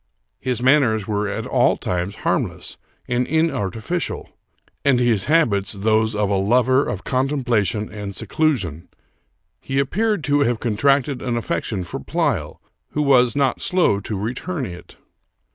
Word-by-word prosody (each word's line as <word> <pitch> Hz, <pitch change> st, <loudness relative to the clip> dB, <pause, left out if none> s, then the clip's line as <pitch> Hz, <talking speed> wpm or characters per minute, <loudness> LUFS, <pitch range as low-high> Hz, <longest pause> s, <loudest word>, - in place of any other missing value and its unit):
His 125 Hz, -2 st, -2 dB
manners 125 Hz, -7 st, +3 dB
were 105 Hz, -1 st, -1 dB
at 100 Hz, -, -4 dB
all -, -, +2 dB
times 90 Hz, +2 st, -2 dB
harmless -, -, -1 dB, 0.3 s
and 125 Hz, 0 st, 0 dB
inartificial, 160 Hz, -, -1 dB, 0.5 s
and 140 Hz, -3 st, +3 dB
his 120 Hz, -5 st, +2 dB
habits 115 Hz, -12 st, +2 dB
those 110 Hz, +2 st, +1 dB
of 105 Hz, -1 st, +1 dB
a 100 Hz, 0 st, +1 dB
lover 125 Hz, +6 st, +3 dB
of 100 Hz, -, -4 dB
contemplation 125 Hz, -, 0 dB
and 100 Hz, -2 st, -6 dB
seclusion. 95 Hz, -, -1 dB, 0.7 s
He 135 Hz, 0 st, -2 dB
ap 140 Hz, -1 st, 0 dB
peared 215 Hz, -4 st, 0 dB
to 145 Hz, 0 st, +2 dB
have 120 Hz, -5 st, +1 dB
contracted 135 Hz, +4 st, +1 dB
an 120 Hz, -2 st, -1 dB
affection 110 Hz, -4 st, -2 dB
for 85 Hz, -, -6 dB
Pleyel, -, -, -1 dB, 0.3 s
who 150 Hz, -, +1 dB
was 125 Hz, -4 st, +4 dB
not 140 Hz, -3 st, +1 dB
slow 180 Hz, -, +2 dB
to 105 Hz, +1 st, -4 dB
return 125 Hz, -, -3 dB
it. 90 Hz, -4 st, -10 dB
120 Hz, 145 wpm, -21 LUFS, 105-140 Hz, 0.7 s, was